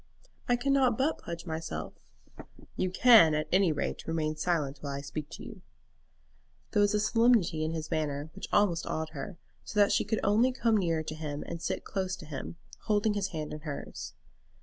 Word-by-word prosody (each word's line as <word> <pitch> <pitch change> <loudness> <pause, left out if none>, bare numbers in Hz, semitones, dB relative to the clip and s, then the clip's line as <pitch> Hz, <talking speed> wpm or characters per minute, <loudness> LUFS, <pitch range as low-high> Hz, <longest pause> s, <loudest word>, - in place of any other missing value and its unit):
"I 245 - +5
cannot 260 -2 +2
but 285 +4 +1
pledge 170 0 -7
myself." 160 - -4 0.8
"You 185 - 0
can 185 -6 +7
at 155 - -1
any 185 -2 +4
rate 150 - -3
remain 155 -1 -1
silent 150 -4 -1
while 140 -1 -4
I 140 - -4
speak 145 +1 -6
to - - -9
you." - - -10 1.1
There 205 - +3
was 205 0 +3
a - - +2
solemnity 215 -7 +3
in 160 +1 -1
his 160 -1 -5
manner 150 -1 -2
which 195 - -7
almost 185 -5 +2
awed 160 0 -2
her, 155 +4 -7 0.3
so 210 - -3
that 205 - +5
she - - +3
could 220 - -1
only 230 +5 +3
come 230 -3 +2
nearer 165 -5 0
to 155 - -5
him 150 -2 -5
and 170 - -6
sit - - -3
close 190 -1 -2
to 160 - -11
him, 135 - -6 0.3
holding 210 0 +2
his 200 -2 -1
hand 155 -5 -5
in 150 - -5
hers. 150 -2 -7
170 Hz, 195 wpm, -30 LUFS, 155-210 Hz, 1.1 s, can